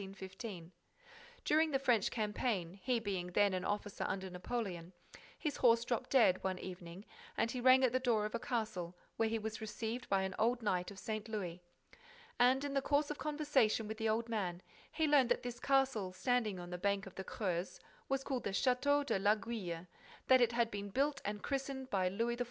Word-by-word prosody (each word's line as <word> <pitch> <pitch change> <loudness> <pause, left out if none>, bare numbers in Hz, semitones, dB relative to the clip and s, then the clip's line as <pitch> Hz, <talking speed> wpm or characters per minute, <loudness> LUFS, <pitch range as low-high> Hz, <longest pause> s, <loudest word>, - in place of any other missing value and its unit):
During 315 +1 +4
the 275 - +2
French 245 -6 +2
campaign, 210 -5 -1
he 245 +2 +1
being 195 -5 -3
then 205 0 +4
an 185 0 -1
officer 205 0 -2
under 190 -1 -3
Napoleon, 180 -2 -4 0.4
his 300 -4 -2
horse 235 -1 +4
dropped 240 -1 -2
dead, 225 -9 +4
one 190 -1 -1
evening, 180 +1 -8 0.3
and 230 - +1
he 250 - -3
rang 260 +1 +7
at 255 - +4
the 255 - +2
door 235 -5 +2
of 215 - -4
a 235 - -1
castle 215 -9 -3 0.2
where 225 -1 +2
he 225 - 0
was 220 0 -5
received 220 +3 -4
by 195 -1 +2
an 190 0 -2
old 235 +2 +2
knight 180 -4 0
of 200 - -10
St. 215 +2 -4
Louis. 180 -5 -4 0.8
And, 260 +3 +5
in 285 -1 -3
the 275 - +2
course 290 +2 +1
of 295 - -6
conversation 290 -8 +1
with 220 +1 -5
the 225 -1 0
old 225 +2 0
man, 190 -6 -2 0.3
he 320 - +1
learnt 285 -5 +5
that 245 - +1
this 245 -1 -5
castle, 265 -9 +1
standing 220 0 0
on 175 0 -8
the 180 - -4
bank 200 +1 0
of 195 - -10
the 190 - -6
Creuse, 185 -3 -3 0.3
was 270 0 0
called 265 -3 -3
the - - 0
Château 285 +3 +2
de 195 - 0
l'Aiguille, 205 -4 -1 0.4
that 260 -1 +6
it 240 -1 +4
had 235 -1 +1
been 205 0 -4
built 280 +7 0
and 205 0 -4
christened 270 -1 -3
by 185 -2 +2
Louis 230 +5 -1
XIV. - - -13
225 Hz, 200 wpm, -36 LUFS, 195-255 Hz, 0.8 s, rang